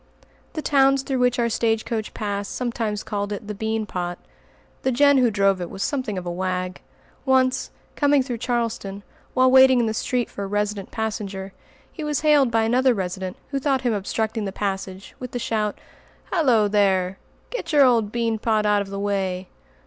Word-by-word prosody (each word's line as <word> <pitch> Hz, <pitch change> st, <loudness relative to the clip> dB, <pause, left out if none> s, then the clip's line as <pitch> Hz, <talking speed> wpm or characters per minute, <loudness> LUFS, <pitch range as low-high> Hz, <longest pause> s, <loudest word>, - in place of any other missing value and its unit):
The 310 Hz, -, -4 dB
towns 275 Hz, -1 st, +4 dB
through 265 Hz, -2 st, -1 dB
which 250 Hz, 0 st, +2 dB
our 235 Hz, -1 st, +2 dB
stage 225 Hz, -1 st, 0 dB
coach 220 Hz, -2 st, -3 dB
passed 200 Hz, -1 st, -3 dB
sometimes 230 Hz, -4 st, -2 dB
called 205 Hz, -1 st, -3 dB
it 205 Hz, 0 st, -5 dB
the 210 Hz, -, -3 dB
"bean 220 Hz, +1 st, -2 dB
pot." 175 Hz, -3 st, -4 dB, 0.6 s
The 260 Hz, -, +1 dB
Jehn 285 Hz, +2 st, +5 dB
who 245 Hz, -2 st, +4 dB
drove 195 Hz, -3 st, +2 dB
it 175 Hz, -, -4 dB
was 195 Hz, 0 st, -4 dB
something 255 Hz, -8 st, -2 dB
of 180 Hz, -, -5 dB
a 175 Hz, -, -2 dB
wag. 185 Hz, 0 st, -3 dB, 0.4 s
Once, 260 Hz, -1 st, +2 dB, 0.3 s
coming 285 Hz, -2 st, +3 dB
through 245 Hz, -3 st, -4 dB
Charlestown, 230 Hz, -5 st, -2 dB, 0.3 s
while 255 Hz, 0 st, +5 dB
waiting 260 Hz, -1 st, +7 dB
in 235 Hz, -, +2 dB
the 220 Hz, -, -1 dB
street 245 Hz, +2 st, -1 dB
for 200 Hz, -, -5 dB
a -, -, -3 dB
resident 205 Hz, -1 st, -2 dB
passenger, 200 Hz, -3 st, -4 dB, 0.4 s
he 315 Hz, -, -7 dB
was 300 Hz, -2 st, -1 dB
hailed 295 Hz, -4 st, +4 dB
by 225 Hz, -1 st, +2 dB
another 250 Hz, +2 st, +3 dB
resident 185 Hz, -1 st, -4 dB
who 275 Hz, -, 0 dB
thought 270 Hz, -1 st, +1 dB
him 245 Hz, -3 st, +1 dB
obstructing 220 Hz, +2 st, -2 dB
the 195 Hz, -, -3 dB
passage, 190 Hz, -1 st, -4 dB
with 250 Hz, -1 st, -7 dB
the -, -, -1 dB
shout, 215 Hz, -3 st, -1 dB, 0.5 s
"Halloo 250 Hz, -, +3 dB
there! 190 Hz, -2 st, +2 dB, 0.3 s
Get -, -, -4 dB
your 290 Hz, -3 st, +6 dB
old 230 Hz, -5 st, +3 dB
bean 230 Hz, -1 st, -1 dB
pot 215 Hz, -1 st, +1 dB
out 210 Hz, -1 st, +3 dB
of 200 Hz, -, -6 dB
the 195 Hz, 0 st, -5 dB
way!" 190 Hz, -2 st, -2 dB
220 Hz, 190 wpm, -23 LUFS, 200-255 Hz, 0.6 s, waiting